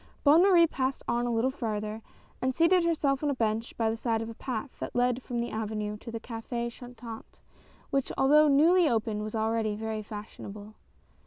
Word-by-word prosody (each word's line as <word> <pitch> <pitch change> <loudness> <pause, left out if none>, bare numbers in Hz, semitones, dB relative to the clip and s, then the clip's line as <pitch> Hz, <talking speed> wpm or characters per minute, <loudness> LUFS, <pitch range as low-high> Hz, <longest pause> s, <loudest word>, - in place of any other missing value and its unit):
Bonne 305 +3 +7
Marie 360 -3 +6
passed 265 -4 -2
on 240 +1 0
a - - 0
little 235 +3 +1
farther 215 -4 -4 0.4
and 260 0 0
seated 345 +2 +4
herself 300 -5 +1
on 295 - +1
a 280 - 0
bench 225 -1 -1
by 225 - +1
the 220 - 0
side 230 -1 -1
of 225 0 -4
a - - -8
path 255 +3 -5
that - - -5
led 245 +1 +2
from 245 -1 -4
the 235 - -2
avenue 215 -1 -3
to 230 - -10
a - - -8
Oaf^ 235 +1 -4
Chantant, 240 -2 -10 0.5
which, 275 -1 0
although 300 +3 +5
newly 320 +4 +5
opened, 220 -3 -1
was 215 +1 -5
already 220 -1 0
very 220 0 -3
fashionable. 210 0 -9
235 Hz, 190 wpm, -29 LUFS, 220-275 Hz, 0.5 s, Bonne